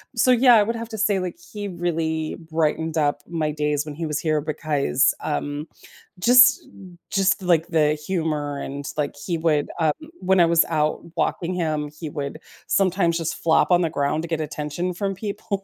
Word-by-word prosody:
so, 255 +2 +4
yeah, 245 0 +6
I 210 - +6
would 230 +3 -2
have 230 0 -6
to 220 - -6
say, 205 -2 +2
like, 180 -2 -4 0.2
he 205 -1 -4
really 165 -3 -2 0.2
brightened 160 0 0
up 145 -1 +1
my 160 -3 -1
days 150 -1 -1
when 150 -1 -7
he 165 +1 -4
was 150 -1 -2
here 155 -1 0
because, 145 -2 +1
um, 145 0 -3 0.5
just 250 +7 +6 0.4
just, 195 -1 +2
like, 170 -2 +2
the 155 -2 +3
humor 150 -3 -2
and, 140 +1 -6
like, 145 -1 -2
he 170 -3 -1
would, 155 -3 +1
um, 155 -2 +2 0.3
when 185 0 +3
I - - +6
was 165 0 +4
out 155 -2 0 0.2
walking 180 +1 -1
him, 155 -4 -2
he 155 -1 -6
would 140 -2 -5 0.3
sometimes 185 -3 +2
just 165 -1 -4
flop 165 +2 +3
on 175 0 +5
the 165 - +1
ground 150 +1 -1
to 170 - -5
get 160 -1 -2
attention 155 +4 -3
from 195 +1 -3
people. 200 0 -4
160 Hz, 190 wpm, -23 LUFS, 150-185 Hz, 0.5 s, yeah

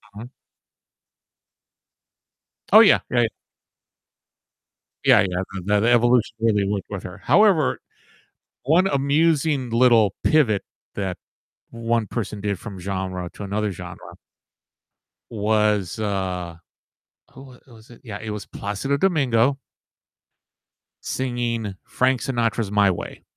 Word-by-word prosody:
Uh-huh. 115 +3 -8 2.5
Oh, - - +10
yeah, - - +6
yeah. 120 -2 +2 1.8
Yeah - - +6
yeah, 90 -1 -1 0.2
the 105 0 +2
the 115 +3 +2
evolution 120 -1 +3
really 105 -3 +2
worked 100 -1 -3
with 100 -2 -6
her. 90 +2 -9
However, 195 -9 +3 0.9
one 170 +7 +3
amusing 145 -3 +1
little 115 -4 +4
pivot 120 -10 +3 0.3
that 95 -3 -3 0.5
one 115 -1 -1
person 105 -2 -5
did 100 -3 -2
from 100 -5 -9
genre 95 -1 -4
to 105 - -7
another 105 +1 -2
genre - - -10 1.2
was, 105 -3 0
uh, 90 -5 -3 0.8
who 135 0 -13
w - - -18
was 115 -1 -17
it? 120 - -16
Yeah, 105 -4 -7
it 110 - -6
was 105 -1 -5
Plácido 105 +8 -3
Domingo 135 -7 +2 1.4
singing 120 -5 -3
Frank 130 0 0
Sinatra's 115 -5 -1
"My 100 -1 +4
Way." - - -7
110 Hz, 110 wpm, -22 LUFS, 100-125 Hz, 2.5 s, Oh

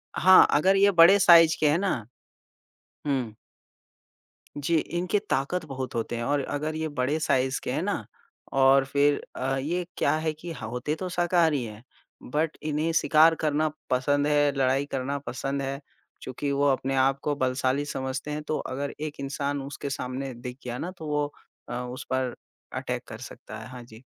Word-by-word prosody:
हाँ, 185 0 +8
अगर 185 +6 +4
ये 200 +1 +5
बड़े 175 +2 +7
साइज़ 170 -3 +7
के 150 - +4
हैं 150 - +3
ना 195 -5 +1 1.1
हुँ। 130 -6 -1 1.2
जी, 145 +4 0
इनकी 175 +6 -1
ताकत 160 +6 -1
बहुत 135 -3 -5
होते 115 +1 -2
हैं 120 - -3
और 140 +1 0
अगर 150 +3 -3
ये 160 0 -2
बड़े 145 +1 -1
साइज़ 130 -3 +1
के - - -3
हैं - - -1
ना - - -2 0.6
और 135 0 +6
फिर 145 +1 +2
अ, 135 +1 -1
ये 170 +6 -2
क्या - - +2
है 155 0 -1
कि 165 +3 -8
ह - - -7
होते 125 +5 -2
तो 185 +2 -5
शाकाहारी 170 -6 +2
हैं, 110 0 -9 0.4
बट 150 +4 -1
इन्हें 155 +2 0
शिकार 160 0 +5
करना 155 +1 +2 0.2
पसंद 145 +3 +1
है, 145 -1 +3
लड़ाई 135 +1 +2
करना 135 +1 -2
पसंद 135 +2 -3
है, 135 0 -3 0.4
चूंकि 140 +2 -4
वो 140 +1 +2
अपने 135 0 -1
आप 135 +1 +2
को 145 -1 0
बलशाली 130 +1 0
समझते 130 +1 -4
हैं, 150 - -3
तो 155 0 -2
अगर 140 +2 -4
एक 155 -1 -5
इंसान 140 +1 -2
उसके 140 +1 -6
सामने 135 -1 -4
दिख 125 +1 -8
गया 120 0 -4
ना 175 +7 -4
तो 160 -2 -7
वो 150 0 0 0.4
अ, - - -4
उस 125 +1 -5
पर 130 -1 -1 0.4
अटैक - - -3
कर - - -8
सकता 110 +1 -9
है। 110 - -9
हाँ 125 -2 -9
जी। 115 0 -15
140 Hz, 180 wpm, -26 LUFS, 130-155 Hz, 1.2 s, हाँ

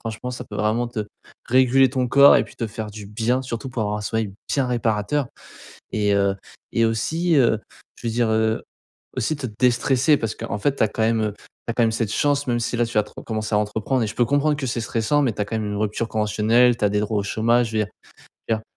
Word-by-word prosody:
Franchement, 115 +2 -5
ça 125 0 -6
peut 105 - -8
vraiment 110 +3 0
te 115 -2 -4 0.5
réguler 130 +1 +4
ton 130 -2 0
corps, 140 +2 +7
et - - +2
puis, - - -16
te 115 - -2
faire 110 0 -6
du 105 -1 -9
bien 115 +5 0
surtout, 125 +1 -5
pour 115 -2 -2
avoir 105 0 -1
un - - -6
sommeil 110 -2 -2 0.2
bien 135 -3 +1
réparateur. 120 +3 0 0.7
Et 105 -1 +1
heu 100 -1 +2 0.4
et 115 - +2
aussi, 160 +9 0
heu, 115 -4 +3 0.4
je - - -8
veux 115 - -1
dire, 120 -1 +1
heu, 110 0 +1 0.5
aussi 135 +5 -1
te 135 -3 -4
déstresser 130 +4 +3
parce 110 -1 -3
qu'en 105 - -4
fait 140 +5 0
tu - - 0
as 110 - +4
quand 110 - -6
même, 110 0 +2
heu, 105 -1 -1
tu - - -21 0.3
as - - +1
quand 120 - +2
même 110 - +1
cette 110 -2 -1
chance 145 +1 +1
même 120 -1 +1
si 120 +1 -2
là, 120 - +2
tu 115 - -9
vas 105 - +3
re - - -12
commencer 110 -1 -3
à - - +4
entreprendre, 110 +4 -1
et - - -1
je - - -6
peux 120 - +3
comprendre 145 +1 +2
que 135 -2 -3
stressant. 120 +3 0
Mais, 125 -5 +1
tu - - -6
as - - -3
quand 110 - -3
même 105 - -3
une 105 0 -3
rupture 110 +2 -1
conventionnelle. 110 +3 +3
Tu 105 - -2
as 100 - +3
des 105 - +1
droits 105 0 -1
au - - 0
chômage. 115 +3 +2
Je 110 - -1
veux 105 - +2
dire - - -10 0.6
je - - +3
veux - - -3
dire, - - -17
115 Hz, 260 wpm, -22 LUFS, 110-125 Hz, 0.7 s, corps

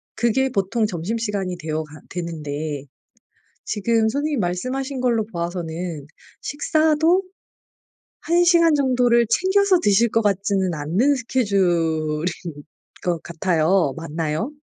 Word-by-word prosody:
그게 250 +4 +1
보통 215 0 0
점심시간이 200 0 -3
되어 160 -1 -3
가 150 0 -14
되는데 155 -4 -4 0.8
지금 220 +1 +1
선생님이 285 +4 -1
말씀하신 255 +9 -2
걸로 235 -4 +2
보아서는 170 -4 -5 0.3
식사도 315 +4 +2 1.0
1 345 +2 +2
시간 335 -2 +5
정도를 245 -4 +3
챙겨서 380 - +3
드실 210 +3 +3
것 225 - +1
같지는 195 -3 0
않는 175 - +1
스케줄인 175 - 0 0.7
것 170 -3 -1
같아요. 170 -2 +1
맞나요? 165 - -3
200 Hz, 250 characters per minute, -22 LUFS, 165-255 Hz, 1.0 s, 시간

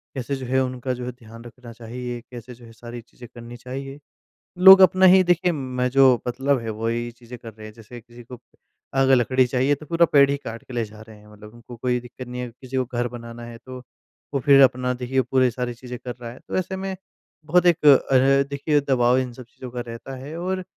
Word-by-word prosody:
कैसे 135 +1 -3
जो 130 -1 -7
है 130 +2 +1
उनका 130 0 -4
जो 125 0 -6
है 125 - -4
ध्यान 115 -1 -14
रखना 120 0 -13
चाहिए, 120 +1 -7
कैसे 120 +1 -10
जो 120 0 -16
है 115 - -14
सारी 120 +1 -10
चीज़ें 120 +1 -15
करनी 120 0 -10
चाहिए। 135 +3 -8 0.6
लोग 190 +1 +9
अपना 185 +1 +5
ही 185 +1 +7
देखिए, 175 0 +2
मैं 130 -4 -3
जो 130 -2 +4
मतलब 135 +2 0
है 115 -1 -6
वही 115 +2 -3
चीज़ें 120 +1 -12
कर 115 -1 -11
रहे 110 0 -12
हैं, 110 - -13
जैसे 115 +2 -12
किसी 120 +2 -15
को, 125 +1 -12 0.5
अगर 135 0 +4
लकड़ी 130 +1 +2
चाहिए 130 +3 +1
तो 155 - -13
पूरा 170 +1 +3
पेड़ 140 -1 +5
ही 140 - 0
काट 115 -4 -9
के 130 - -13
ले 120 -1 -1
जा 110 0 -14
रहे 110 -1 -14
हैं, 105 0 -19
मतलब 105 +1 -15
उनको 120 +1 -13
कोई 125 +1 -1
दिक्कत 125 +1 -11
नहीं 125 0 -6
है। 125 - -5
किसी 130 +2 -8
को 130 - 0
घर 120 0 -3
बनाना 120 0 -10
है 120 0 -10
तो 130 -1 -9 0.5
वो 140 - 0
फिर 140 +2 +5
अपना 125 -1 +3
देखिए 125 +1 -1
पूरी 130 0 +1
सारी 125 +1 -4
चीज़ें 125 +1 -9
कर 125 -1 -7
रहा 115 -1 -7
है, 125 - -13
तो - - -5
ऐसे 185 +1 -3
में 190 0 -4 0.5
बहुत 175 +3 +2
एक 170 -3 +2
अ, 135 -1 +5
देखिए 145 +1 0
दबाव 125 -1 +3
इन 130 -1 -2
सब 125 +1 -11
चीज़ों 125 +1 -12
का 125 0 -5
रहता 115 +3 -8
है 135 +5 -9
और 185 +1 -3
125 Hz, 235 wpm, -22 LUFS, 120-135 Hz, 0.6 s, लोग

